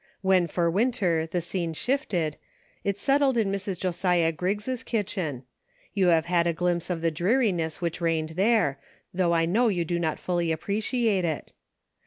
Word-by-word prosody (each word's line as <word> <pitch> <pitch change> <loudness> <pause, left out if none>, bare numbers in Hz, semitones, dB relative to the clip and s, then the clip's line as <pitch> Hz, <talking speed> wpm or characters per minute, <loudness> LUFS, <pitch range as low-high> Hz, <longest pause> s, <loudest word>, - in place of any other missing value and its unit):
When 190 -2 +3
for 170 +1 0
Winter 180 -4 +1
the 175 +2 -2
scene 170 -1 -3
shifted, 175 - -1 0.5
it 200 -1 -1
settled 275 +3 +2
in 210 -4 +1
Mrs. 195 -1 -3
Josiah 180 -2 +1
Griggs' 205 +9 -2
kitchen; 185 - -3 0.5
you 195 -3 +2
have 165 -2 +4
had 175 -1 +2
a 170 - +1
glimpse 175 +1 -1
of 175 -2 -2
the 165 0 +1
dreariness 175 - 0
which 170 0 -2
reigned 165 -2 0
there, 185 -5 +2 0.3
though 175 -2 +2
I 165 0 +3
know 225 +9 +2
you 175 -6 0
do 170 +1 -1
not 160 -2 -1
fully 175 -2 -1
appreciate 205 - 0
it. 160 -3 -3
180 Hz, 165 wpm, -26 LUFS, 165-205 Hz, 0.5 s, have